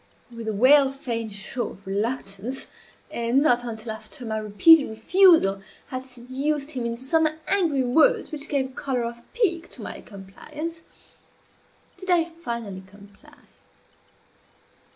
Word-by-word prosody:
With 230 Hz, -1 st, -7 dB
a -, -, 0 dB
well 265 Hz, +6 st, +6 dB
feigned 235 Hz, -5 st, -4 dB
show 210 Hz, +5 st, -4 dB
of 200 Hz, -, -15 dB
reluctance, 205 Hz, +3 st, -3 dB, 0.4 s
and 235 Hz, +3 st, +1 dB
not 245 Hz, -5 st, +3 dB
until 225 Hz, -1 st, -5 dB
after 220 Hz, +3 st, -6 dB
my 220 Hz, -1 st, -2 dB
repeated 275 Hz, +9 st, +5 dB
refusal 220 Hz, -, +4 dB, 0.3 s
had 255 Hz, 0 st, -5 dB
seduced 270 Hz, +4 st, -3 dB
him 245 Hz, -4 st, -3 dB
into 235 Hz, +2 st, -3 dB
some 320 Hz, +4 st, +3 dB, 0.2 s
angry 330 Hz, -9 st, +3 dB
words 315 Hz, -, +3 dB
which 305 Hz, -1 st, -5 dB
gave 275 Hz, -2 st, +1 dB
a 260 Hz, -, -10 dB
color 255 Hz, -2 st, -2 dB
of 235 Hz, 0 st, -6 dB
pique 360 Hz, -8 st, 0 dB
to -, -, -10 dB
my -, -, -7 dB
compliance, 300 Hz, +12 st, -8 dB, 1.2 s
did 375 Hz, -, -8 dB
I 345 Hz, -2 st, +4 dB
finally 235 Hz, -, -6 dB
comply. 200 Hz, +1 st, -18 dB
255 Hz, 135 wpm, -24 LUFS, 220-305 Hz, 1.2 s, well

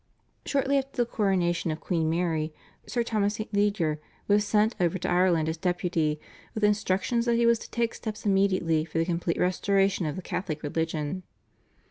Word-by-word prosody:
Shortly 275 Hz, 0 st, +2 dB
after 270 Hz, 0 st, -8 dB
the 240 Hz, -, +3 dB
coronation 185 Hz, -7 st, 0 dB
of 155 Hz, 0 st, -2 dB
Queen 165 Hz, -3 st, 0 dB
Mary 165 Hz, -2 st, 0 dB, 0.4 s
Sir 240 Hz, -2 st, 0 dB
Thomas 210 Hz, -2 st, 0 dB
St. 215 Hz, 0 st, -6 dB
Leger 200 Hz, -7 st, +1 dB, 0.3 s
was 205 Hz, 0 st, +4 dB
sent 215 Hz, +2 st, +3 dB
over 175 Hz, 0 st, +1 dB
to 180 Hz, -, -3 dB
Ireland 175 Hz, -3 st, +3 dB
as 160 Hz, +1 st, -2 dB
Deputy 170 Hz, -3 st, 0 dB, 0.4 s
with 215 Hz, -, -3 dB
instructions 210 Hz, +3 st, +1 dB
that 235 Hz, -, +3 dB
he 235 Hz, 0 st, +3 dB
was 235 Hz, -1 st, +4 dB
to -, -, -10 dB
take 235 Hz, -1 st, -1 dB
steps 215 Hz, -1 st, -6 dB
immediately 185 Hz, -5 st, +2 dB
for 165 Hz, 0 st, -6 dB
the 165 Hz, -, +2 dB
complete 170 Hz, -1 st, -1 dB
restoration 195 Hz, 0 st, +1 dB
of 150 Hz, -, -3 dB
the 185 Hz, -, -6 dB
Catholic 160 Hz, -5 st, -4 dB
religion. 160 Hz, +2 st, -2 dB
185 Hz, 175 wpm, -27 LUFS, 165-210 Hz, 0.4 s, was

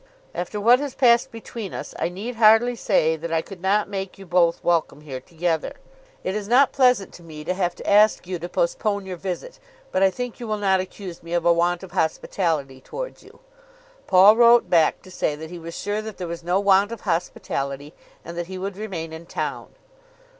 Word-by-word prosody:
After 180 Hz, +4 st, -4 dB
what 235 Hz, +4 st, +5 dB
has 285 Hz, -2 st, -5 dB
passed 245 Hz, 0 st, +4 dB
between 225 Hz, -2 st, -7 dB
us -, -, -6 dB
I -, -, 0 dB
need 215 Hz, +7 st, -6 dB
hardly 225 Hz, +2 st, +5 dB
say 160 Hz, -8 st, +2 dB
that 165 Hz, +1 st, -6 dB
I 165 Hz, -1 st, +1 dB
could 195 Hz, -3 st, -11 dB
not 200 Hz, +2 st, +2 dB
make 195 Hz, -1 st, -5 dB
you 195 Hz, -, -11 dB
both 175 Hz, -1 st, +2 dB
welcome 165 Hz, -4 st, 0 dB
here 135 Hz, -4 st, -7 dB
together. 165 Hz, -, -2 dB, 0.5 s
It 185 Hz, -, -2 dB
is 210 Hz, -1 st, -4 dB
not 255 Hz, +4 st, +5 dB
pleasant 250 Hz, -7 st, +2 dB
to -, -, -13 dB
me 155 Hz, -2 st, -9 dB
to 180 Hz, -, -1 dB
have 180 Hz, -2 st, -1 dB
to -, -, -10 dB
ask 210 Hz, 0 st, +4 dB
you 180 Hz, -1 st, -4 dB
to 175 Hz, +2 st, -6 dB
postpone 215 Hz, -, -1 dB
your 185 Hz, -1 st, -6 dB
visit, 190 Hz, -, -6 dB, 0.3 s
but 185 Hz, -, 0 dB
I 195 Hz, -, +6 dB
think 245 Hz, +5 st, -6 dB
you 240 Hz, -, -6 dB
will 215 Hz, 0 st, -1 dB
not 195 Hz, -2 st, +2 dB
accuse 185 Hz, -1 st, -7 dB
me 170 Hz, 0 st, -8 dB
of 170 Hz, -1 st, 0 dB
a 170 Hz, -, +6 dB
want 175 Hz, +1 st, 0 dB
of 190 Hz, -, -10 dB
hospitality 155 Hz, -4 st, -1 dB
towards -, -, -7 dB
you." -, -, -18 dB, 0.7 s
Paul 195 Hz, +3 st, +7 dB
wrote 235 Hz, 0 st, +6 dB
back 165 Hz, -3 st, +3 dB
to 185 Hz, -, -14 dB
say 150 Hz, -4 st, -1 dB
that 160 Hz, +2 st, -9 dB
he 175 Hz, -, -7 dB
was 165 Hz, 0 st, -8 dB
sure 205 Hz, +2 st, -2 dB
that 215 Hz, -1 st, -8 dB
there 180 Hz, -, -4 dB
was 170 Hz, 0 st, -6 dB
no 180 Hz, +3 st, +1 dB
want 200 Hz, +1 st, +4 dB
of 230 Hz, -, -7 dB
hospitality, 145 Hz, -5 st, -3 dB, 0.3 s
and 170 Hz, -, -7 dB
that 170 Hz, -, -4 dB
he 190 Hz, 0 st, -7 dB
would 195 Hz, +1 st, -5 dB
remain 175 Hz, -7 st, -5 dB
in 165 Hz, +1 st, -9 dB
town. -, -, -4 dB
190 Hz, 215 wpm, -23 LUFS, 170-215 Hz, 0.7 s, Paul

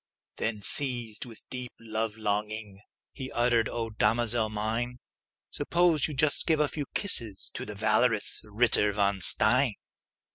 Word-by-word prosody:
Then, 105 Hz, -3 st, -3 dB
seized 120 Hz, -5 st, +1 dB
with 115 Hz, -3 st, -11 dB
a -, -, -39 dB
deep 125 Hz, -1 st, -6 dB
love 110 Hz, -1 st, -4 dB
longing, 105 Hz, -1 st, -3 dB, 0.3 s
He 130 Hz, -2 st, -7 dB
uttered, 120 Hz, -2 st, +1 dB
"O 115 Hz, -1 st, -4 dB
damosel 115 Hz, +1 st, +1 dB
mine, 110 Hz, +4 st, -3 dB, 0.5 s
Suppose 165 Hz, 0 st, +2 dB
you 150 Hz, -, -7 dB
just 145 Hz, +2 st, +2 dB
give 160 Hz, -2 st, +2 dB
a 150 Hz, -, +3 dB
few 145 Hz, -1 st, -5 dB
kisses 115 Hz, -, 0 dB
To -, -, -6 dB
the 105 Hz, -, -7 dB
valorous 110 Hz, +1 st, +1 dB
Ritter 105 Hz, -1 st, +3 dB
von 100 Hz, -1 st, 0 dB
Stein!" 115 Hz, +5 st, +5 dB
115 Hz, 145 wpm, -28 LUFS, 105-125 Hz, 0.5 s, Stein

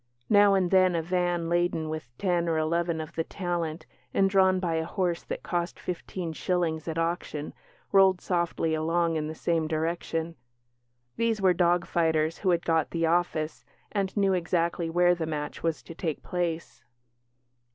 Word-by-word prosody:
Now 205 Hz, -1 st, +6 dB
and 185 Hz, -2 st, +1 dB
then 185 Hz, -2 st, +5 dB
a 165 Hz, -, +1 dB
van, 175 Hz, -1 st, 0 dB
laden 170 Hz, -2 st, 0 dB
with 155 Hz, -5 st, -5 dB
ten 175 Hz, -3 st, +1 dB
or 160 Hz, -, +1 dB
eleven 165 Hz, +1 st, 0 dB
of 160 Hz, +1 st, -6 dB
"the 165 Hz, -, -1 dB
talent", 170 Hz, -3 st, -3 dB, 0.3 s
and 195 Hz, -, +4 dB
drawn 190 Hz, -1 st, +4 dB
by 175 Hz, -3 st, -1 dB
a 160 Hz, -, 0 dB
horse 175 Hz, 0 st, -1 dB
that -, -, -5 dB
cost 175 Hz, 0 st, -2 dB
fifteen 175 Hz, -1 st, -5 dB
shillings 165 Hz, -2 st, -1 dB
at 165 Hz, 0 st, -3 dB
auction, 165 Hz, -3 st, -2 dB, 0.4 s
rolled 190 Hz, -2 st, +5 dB
softly 170 Hz, -3 st, -1 dB
along 165 Hz, +1 st, +1 dB
in 155 Hz, -1 st, -1 dB
the 160 Hz, -, -6 dB
same 165 Hz, -1 st, 0 dB
direction. 165 Hz, +1 st, -2 dB, 0.8 s
These 230 Hz, -2 st, +1 dB
were 190 Hz, -2 st, +4 dB
dog 175 Hz, 0 st, +2 dB
fighters 160 Hz, -1 st, +1 dB
who 190 Hz, -, 0 dB
had 170 Hz, -1 st, +1 dB
got 165 Hz, -2 st, +2 dB
"the 165 Hz, -1 st, 0 dB
office", 165 Hz, -2 st, 0 dB, 0.3 s
and 195 Hz, -1 st, -2 dB
knew 195 Hz, -1 st, +3 dB
exactly 170 Hz, -1 st, 0 dB
where 175 Hz, +1 st, +4 dB
the 165 Hz, -2 st, -3 dB
match 150 Hz, -2 st, -4 dB
was 165 Hz, -2 st, -1 dB
to -, -, -9 dB
take 160 Hz, -2 st, -4 dB
place. 170 Hz, -7 st, -3 dB
170 Hz, 170 wpm, -27 LUFS, 160-180 Hz, 0.8 s, Now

